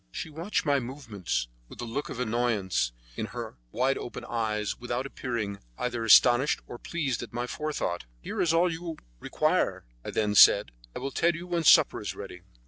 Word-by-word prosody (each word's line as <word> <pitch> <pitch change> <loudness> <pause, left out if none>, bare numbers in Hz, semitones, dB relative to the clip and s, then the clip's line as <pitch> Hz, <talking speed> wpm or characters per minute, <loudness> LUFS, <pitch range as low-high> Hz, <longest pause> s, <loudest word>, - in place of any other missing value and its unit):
She 155 - -6
watched 170 +6 -2
my 140 -2 +3
movements 115 - -4 0.2
with - - -13
a 120 - -3
look 120 +5 -4
of 125 - -6
annoyance 110 - 0 0.2
in - - -3
her - - -7
wide 130 +3 +1
open 120 - -7
eyes, 105 -2 -2
without 120 +1 -3
appearing 115 -7 -4 0.2
either 120 -2 -2
astonished 120 +5 +6
or 120 - -9
pleased 145 -8 -2
at 120 - -8
my 120 +1 -2
forethought. 145 - -3
"Here - - -4
is 165 - +3
all 165 +2 +4
that - - -2
you 165 -1 -6 0.2
require," - - 0 0.2
I - - -6
then 105 -1 0
said; 105 - +7 0.2
"I - - -3
will 135 +2 -4
tell 170 +5 +2
you 170 +2 -7
when 170 -2 -1
supper 150 - +6
is - - -4
ready." - - -9
125 Hz, 190 wpm, -28 LUFS, 110-150 Hz, 0.2 s, said